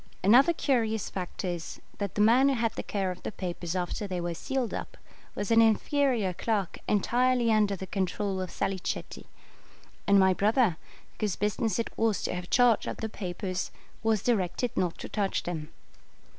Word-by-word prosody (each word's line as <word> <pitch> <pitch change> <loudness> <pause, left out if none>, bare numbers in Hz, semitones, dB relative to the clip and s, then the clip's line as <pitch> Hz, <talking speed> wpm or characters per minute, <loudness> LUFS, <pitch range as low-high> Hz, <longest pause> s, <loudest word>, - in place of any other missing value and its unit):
Another 250 - +6
curious 225 - 0
fact 185 +1 -5
is, 175 -2 -4 0.2
that 200 -3 -3
the 210 - +2
man 245 +6 +5
who 275 - +2
had 230 -2 0
the - - -4
care 195 -3 -2
of 180 - -8
the - - -4
papers 175 -3 -4
after 185 +3 -2
they 185 -2 -3
were 175 0 -2
sealed 255 +7 -2
up - - -6 0.4
was 205 +2 -3
an 230 0 +7
inferior 225 -2 +2
clerk 200 0 -2
entirely 240 +3 +2
under 210 -2 +3
the 190 - -6
control 190 +1 -2
of 185 - -4
Salicetti; 195 0 -3 0.8
and 200 0 +6
my 190 -1 +5
brother, 210 -2 +2 0.4
whose 210 -4 0
business 210 0 0
it 230 - -3
was 225 -2 +1
to - - -1
have 180 0 -5
charge 245 -3 +4
of - - -4
the 220 - -4
papers, 185 -2 -4 0.3
was 220 -3 +1
directed 225 +1 0
not 175 -2 0
to - - -7
touch 200 -2 -1
them. 160 -3 -4
205 Hz, 175 wpm, -28 LUFS, 185-230 Hz, 0.8 s, an